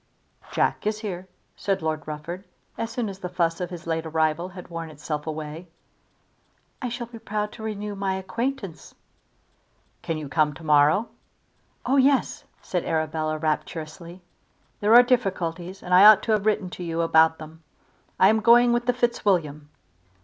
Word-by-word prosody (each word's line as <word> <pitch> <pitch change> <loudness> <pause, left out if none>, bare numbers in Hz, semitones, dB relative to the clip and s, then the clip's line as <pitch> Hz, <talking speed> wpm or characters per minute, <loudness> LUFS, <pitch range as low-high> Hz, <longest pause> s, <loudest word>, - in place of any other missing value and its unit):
"Jack - - 0
is 215 0 -1
here," 185 -4 -5 0.3
said 195 -4 -2
Lord 155 -2 -2
Rufford, 155 +5 -6 0.3
as 230 - -3
soon 230 -1 -3
as 195 -1 -7
the 180 - -5
fuss 170 -1 -1
of 180 - -3
his 175 -2 -9
late 165 -1 -2
arrival 160 +2 0
had 180 -1 -11
worn 165 -1 -6
itself 150 0 -5
away. 155 +2 -6 1.1
"I 250 - -2
shall 240 +1 -4
be 230 0 -12
proud 210 -1 -3
to 225 - -12
renew 210 -1 -4
my 195 -1 -2
acquaintance." 225 0 -4 1.1
"Can 165 - -3
you 155 -2 -6
come 150 0 +1
to 165 - -12
morrow?" 150 +8 +4 0.8
"Oh 265 +3 +2
yes," 270 0 +2 0.2
said 180 -2 -2
Arabella, 155 -1 -1
rapturously. 160 +3 -4 0.6
"There 210 +3 +4
are 245 - +10
difficulties, 190 -6 -1
and 180 - -3
I 185 +3 +8
ought 215 -1 +8
to 225 - -1
have 215 -1 +1
written 205 -4 0
to 180 - -7
you 165 -1 -2
about 160 -1 +4
them. 160 +1 -12 0.6
I 190 - +7
am 220 +1 +3
going 235 +2 +6
with 240 0 -1
the 245 - +3
Fitzwilliam." 180 - 0
180 Hz, 165 wpm, -25 LUFS, 160-215 Hz, 1.1 s, are